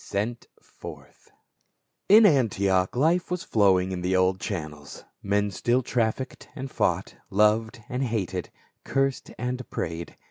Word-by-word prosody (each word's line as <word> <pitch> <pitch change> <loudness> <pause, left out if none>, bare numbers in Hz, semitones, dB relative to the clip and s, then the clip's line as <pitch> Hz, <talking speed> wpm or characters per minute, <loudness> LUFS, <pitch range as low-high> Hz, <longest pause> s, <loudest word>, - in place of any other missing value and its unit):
SENT 110 +4 -3 0.2
FORTH. - - -12 0.8
IN 215 +2 +8
Antioch 100 - +2
life 165 +7 +2
was 180 -1 -2
flowing 95 -3 +3
in 90 -1 -3
the 90 +1 0
old 95 0 +2
channels. 75 -8 -6 0.2
Men 100 +1 0
still 120 +6 +1
trafficked 115 +3 -2
and 135 -2 -6
fought, - - 0 0.2
loved 110 +3 +2
and 125 +1 -3
hated, 95 -6 -2 0.3
cursed 135 -1 -1
and 125 0 -4
prayed. 85 +1 -5
110 Hz, 130 wpm, -26 LUFS, 95-125 Hz, 0.8 s, IN